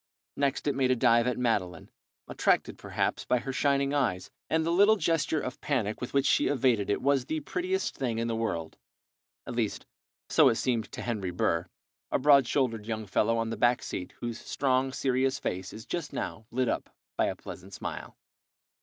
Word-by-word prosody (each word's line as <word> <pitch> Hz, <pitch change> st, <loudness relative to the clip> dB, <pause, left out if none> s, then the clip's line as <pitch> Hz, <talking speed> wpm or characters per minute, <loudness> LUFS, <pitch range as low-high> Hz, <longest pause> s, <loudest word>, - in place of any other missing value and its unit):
Next 140 Hz, -1 st, 0 dB
it 145 Hz, -, +2 dB
made 130 Hz, -2 st, +1 dB
a 130 Hz, -, +4 dB
dive 120 Hz, -1 st, +4 dB
at 125 Hz, -, 0 dB
Madeline, 100 Hz, -8 st, -1 dB, 0.4 s
attracted, -, -, +1 dB
perhaps, -, -, -1 dB
by 125 Hz, -, +2 dB
her 130 Hz, +2 st, -4 dB
shining 140 Hz, +1 st, +1 dB
eyes, 95 Hz, -11 st, 0 dB, 0.2 s
and 160 Hz, 0 st, +1 dB
the 165 Hz, -, +1 dB
little 205 Hz, +5 st, +6 dB
gesture 165 Hz, -5 st, +1 dB
of 125 Hz, -3 st, -6 dB
panic 110 Hz, -7 st, -1 dB
with 125 Hz, -, -4 dB
which 140 Hz, 0 st, +2 dB
she -, -, +3 dB
evaded 125 Hz, -7 st, +2 dB
it 100 Hz, -, 0 dB
was 140 Hz, -2 st, +2 dB
the 155 Hz, +2 st, -2 dB
prettiest 185 Hz, +5 st, -2 dB
thing 120 Hz, -4 st, -1 dB
in 115 Hz, 0 st, -1 dB
the 115 Hz, -, -1 dB
world; 85 Hz, -8 st, -3 dB, 0.7 s
at -, -, -6 dB
least, -, -, -1 dB, 0.4 s
so -, -, +6 dB
it -, -, +1 dB
seemed 115 Hz, -2 st, -1 dB
to -, -, -5 dB
Henry 105 Hz, -6 st, -2 dB
Burr, 85 Hz, 0 st, 0 dB, 0.4 s
a -, -, +2 dB
broad 140 Hz, -2 st, +5 dB
shouldered 115 Hz, -7 st, 0 dB
young 110 Hz, -1 st, -3 dB
fellow 110 Hz, +3 st, +1 dB
on 115 Hz, 0 st, -1 dB
the -, -, -3 dB
back 120 Hz, 0 st, +3 dB
seat, 90 Hz, -, -5 dB
whose 120 Hz, -1 st, -4 dB
strong, 130 Hz, -1 st, 0 dB
serious 130 Hz, 0 st, +1 dB
face 95 Hz, +2 st, -4 dB
is 110 Hz, -, -9 dB
just 170 Hz, -4 st, -4 dB
now 110 Hz, -1 st, -5 dB
lit 130 Hz, +1 st, 0 dB
up -, -, -2 dB, 0.3 s
by -, -, +2 dB
a -, -, -2 dB
pleasant 95 Hz, +2 st, -10 dB
smile. -, -, -6 dB
125 Hz, 195 wpm, -29 LUFS, 110-140 Hz, 0.7 s, little